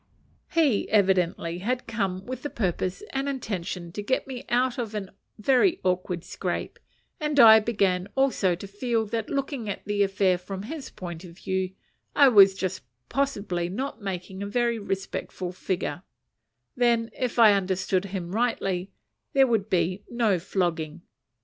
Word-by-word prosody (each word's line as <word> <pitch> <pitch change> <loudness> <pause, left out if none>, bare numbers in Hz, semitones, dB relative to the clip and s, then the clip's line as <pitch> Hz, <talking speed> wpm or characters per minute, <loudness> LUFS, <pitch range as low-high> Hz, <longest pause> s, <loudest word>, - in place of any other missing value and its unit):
He 305 - +2
evidently 180 -4 +2
had 245 +6 -2
come 195 -5 -2
with 255 +1 -5
the 290 - -4
purpose 185 - -2
and 275 +1 -1
intention 185 -9 -4
to 205 - -5
get 260 +6 0
me 255 -2 -7
out 250 +1 +1
of 220 -3 -4
a 200 -2 -5 0.2
very 270 - +3
awkward 180 -1 -1
scrape, - - -4 0.4
and 300 -2 0
I 220 -3 +10
began 195 -5 +1
also 260 -10 +2
to 180 - -9
feel 225 +3 -1
that, 225 +1 -3
looking 270 -5 -2
at 200 - -5
the 205 0 0
affair 195 -2 +2
from 190 +1 -6
his 295 +5 -6
point 175 -4 -8
of 175 -1 -12
view, 190 -1 -2 0.4
I 280 -2 +7
was 195 -4 +7
just 190 -1 -3 0.3
possibly 200 -11 -1
not 240 +4 -4
making 190 -1 -5
a 200 - -3
very 235 +1 0
respectable 195 -2 -4
figure: 180 -4 -3 0.7
then, 235 -2 +2
if 250 -2 -2
I 220 -3 +8
understood 190 -1 0
him 180 -3 -5
rightly, 195 -5 0 0.4
there 270 -2 +6
would 225 -6 0
be 180 +2 +1
no 225 -6 +2
flogging. 170 -2 -2
200 Hz, 155 wpm, -26 LUFS, 185-240 Hz, 0.7 s, I